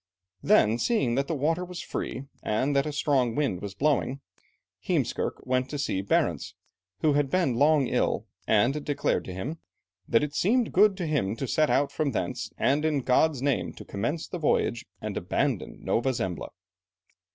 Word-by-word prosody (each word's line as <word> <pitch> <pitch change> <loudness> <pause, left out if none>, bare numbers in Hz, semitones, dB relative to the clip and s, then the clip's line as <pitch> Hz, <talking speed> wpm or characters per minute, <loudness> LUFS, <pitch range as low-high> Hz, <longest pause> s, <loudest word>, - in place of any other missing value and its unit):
Then, 110 +3 +4
seeing 135 - +1
that 140 +2 0
the 165 - -1
water 160 +5 0
was 180 -1 -7
free, 130 - -4 0.2
and 130 +7 0
that 140 +2 +2
a - - -2
strong 135 -5 +1
wind 135 -12 0
was 100 -1 -6
blowing, 140 -2 +1 0.6
Heemskerke - - -2
went 130 0 0
to 145 - -4
seek 100 -8 -2
Barentz, - - 0 0.5
who 150 - +3
had 145 -1 +1
been 175 -5 +2
long 145 +1 +4
ill, - - 0 0.2
and 120 +8 +2
declared 145 -1 0
to 95 - -6
him 145 - -5 0.5
"that 115 - +3
it 145 -1 -3
seemed 230 +9 +1
good 200 0 +5
to 180 - -2
him 140 -10 0
to 135 - -4
set 155 +5 +2
out 140 0 +2
from 145 -3 -1
thence, - - -3
and 145 +3 +2
in 155 -3 +1
God's 135 +2 +2
name 140 -2 0
to - - -11
commence 120 +11 -3
the 180 - -5
voyage 130 -4 0
and 105 -2 -4
abandon 90 - -2
Nova 130 +3 +1
Zembla." 95 - -3
140 Hz, 175 wpm, -27 LUFS, 120-155 Hz, 0.6 s, good